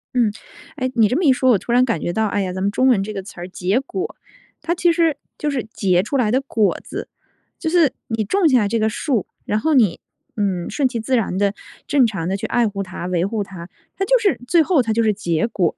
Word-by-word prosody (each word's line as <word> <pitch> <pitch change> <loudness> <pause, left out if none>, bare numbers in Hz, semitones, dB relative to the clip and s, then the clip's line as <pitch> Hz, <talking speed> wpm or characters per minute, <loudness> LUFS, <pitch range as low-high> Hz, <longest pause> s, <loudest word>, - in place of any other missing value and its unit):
嗯。 235 -4 +3 0.4
哎， 255 -3 -2
你 225 -3 +5
这 250 - -1
么 365 - 0
一 290 - +6
说， 260 0 +2
我 225 - +5
突 235 - -6
然 250 +1 +5
感 230 -10 -1
觉 - - -1
到 220 +3 +1
哎 205 0 -1
呀， 185 -1 -2
咱 185 - -4
们 200 +1 +1
中 255 +5 +2
文 230 -7 +4
这 215 +2 -5
个 195 -2 -5
词 190 -2 -12
儿， 175 - -5
结 190 +5 0
果， 375 - -5 0.5
它 340 - -1
其 345 0 +3
实 330 -3 +2 0.2
就 300 - -1
是 270 -5 -2
结 185 -2 +2
出 275 +7 -1
来 225 -5 +2
的 260 +3 +2
果 225 -6 +1
子， - - -6 0.5
就 325 - -1
是 330 -4 +3
你 225 -1 -1
种 370 - +2
下 245 -6 +3
这 230 +3 0
个 220 0 +2
树， 230 - -1 0.2
然 210 - 0
后 315 +8 +1
你， 225 - +3 0.4
嗯， 190 -5 -1
顺 280 -3 +1
其 240 -2 -4
自 255 +4 0
然 205 -6 0
地 200 0 +1 0.3
正 280 -4 +4
常 195 -7 -2
地 190 - 0
去 - - -5
爱 240 -2 +2
护 200 -1 -3
它， 185 -2 -7
维 180 -1 0
护 210 +1 -2
它， 180 -3 -10 0.3
它 390 - 0
就 - - +4
是 415 -4 +1
最 340 +2 +5
后 310 -3 +3
它 225 -2 -2
就 230 - +2
是 215 -1 +3
结 175 -2 -1
果， 180 -8 0
225 Hz, 280 characters per minute, -20 LUFS, 195-270 Hz, 0.5 s, 一